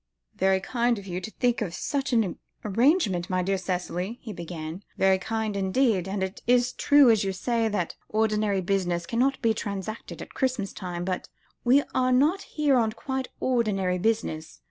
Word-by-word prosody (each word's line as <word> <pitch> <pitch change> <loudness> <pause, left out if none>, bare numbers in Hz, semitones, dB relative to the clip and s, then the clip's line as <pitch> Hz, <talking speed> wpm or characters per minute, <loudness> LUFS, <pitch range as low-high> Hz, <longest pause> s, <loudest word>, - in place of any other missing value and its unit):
"Very 190 0 +3
kind 235 +3 0
of 200 - -8
you 180 -1 -4
to 185 - -6
think 245 +1 0
of 180 -5 -3
such 275 -2 -2
an 225 -7 +1 0.3
arrangement, 210 - +2
my 185 -1 +1
dear 195 +1 0
Cicely," 185 +3 -3
he 220 - -6
began; 170 0 -6 0.2
"very 190 0 +4
kind, 220 +1 -2
indeed. 195 0 +1
And 190 0 -2
it 190 +1 -5
is 245 0 +3
true, 285 -4 +6
as 220 -2 +3
you 195 - 0
say, 230 +4 0
that 205 -6 -1 0.2
ordinary 215 -2 +1
business 175 -2 0
cannot 255 +7 +1
be 225 -1 +4
transacted 205 +1 -5
at - - -14
Christmas 255 -7 -1
time. 175 -1 -5
But 185 -1 -3 0.3
we 265 +4 +5
are 255 -1 +2
not 300 +10 +3
here 290 -4 +1
on 220 -2 +1
quite 265 0 -3
ordinary 200 -7 +1
business. 195 -7 -1
210 Hz, 175 wpm, -26 LUFS, 185-245 Hz, 0.3 s, true